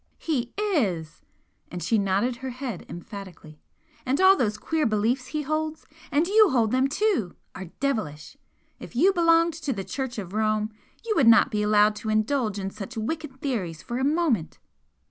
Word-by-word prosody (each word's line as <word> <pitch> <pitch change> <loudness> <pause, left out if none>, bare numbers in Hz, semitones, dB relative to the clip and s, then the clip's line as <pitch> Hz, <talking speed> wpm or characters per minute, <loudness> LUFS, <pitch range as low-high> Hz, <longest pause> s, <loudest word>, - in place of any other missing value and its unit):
"He 255 -7 -2
is!" 205 - -1 0.5
And 180 -2 -6
she 220 +5 +2
nodded 200 +5 0
her 260 +1 -5
head 250 -6 -6
emphatically 175 -4 -10 0.4
"And 265 +2 0
all 380 +1 +7
those 215 - 0
queer 310 +5 0
beliefs 225 +4 0
he 305 -1 -3
holds 310 +2 -3 0.3
and 295 +4 +3
you 420 +2 +5
hold 230 -6 +2
them 260 +1 +3
too! 310 - 0 0.2
are 190 - -7
devilish! 210 - -3 0.4
If - - -11
you 365 +10 +4
belonged 335 -1 +4
to 310 -3 -4
the 200 -6 -3
Church 245 +6 -4
of 195 -3 -6
Rome, 215 0 0 0.3
you 450 - 0
would 270 -7 +4
not 230 +3 +6
be 210 -2 0
allowed 210 0 +4
to 215 +1 -5
indulge 215 0 0
in 195 -1 -4
such 225 +5 -8
wicked 270 +3 -4
theories 185 - -3
for 240 +1 -4
a - - -1
moment." 285 - 0
240 Hz, 175 wpm, -25 LUFS, 210-300 Hz, 0.5 s, all